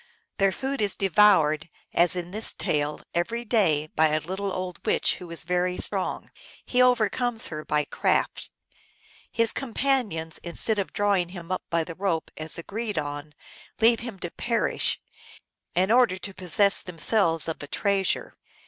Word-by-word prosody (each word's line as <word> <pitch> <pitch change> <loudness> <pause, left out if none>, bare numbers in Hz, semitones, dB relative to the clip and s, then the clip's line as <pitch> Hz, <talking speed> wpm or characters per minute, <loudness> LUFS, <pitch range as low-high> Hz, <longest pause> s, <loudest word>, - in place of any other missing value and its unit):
Their 195 -1 +4
food 270 +3 -3
is 205 -2 +2
devoured, 170 -5 +3 0.2
as 175 0 +4
in 175 -1 -5
this 215 +3 +3
tale, 150 0 -1
every 230 +8 -2
day 175 -10 +2
by 160 0 +4
a 155 0 +1
little 190 +5 -4
old 185 -1 -5
witch - - +1
who 180 - -10
is 170 -1 -2
very 180 +1 0
strong. - - -3 0.3
He 250 - +2
overcomes 245 -1 +2
her 155 -1 -6
by 150 -1 0
craft. - - -1 0.8
His 230 -1 +3
com 260 -5 -5
panions, 210 - 0
instead 205 +5 -1
of 195 - -3
drawing 200 -4 +1
him 175 -1 -9
up 185 - -1
by 170 -1 +1
the 165 - -7
rope, 175 -3 -2
as 155 0 -3
agreed 210 +4 -4
on, 145 0 -4 0.4
leave 230 0 +5
him 235 -3 -7
to 175 - -4
perish, 235 -1 0 0.8
in 185 +4 +2
order 235 -6 +4
to 190 +2 -7
possess 190 +2 +3
themselves 165 -1 +1
of 160 - -4
a 145 - -7
treasure. 195 +4 0
185 Hz, 160 wpm, -26 LUFS, 165-215 Hz, 0.8 s, leave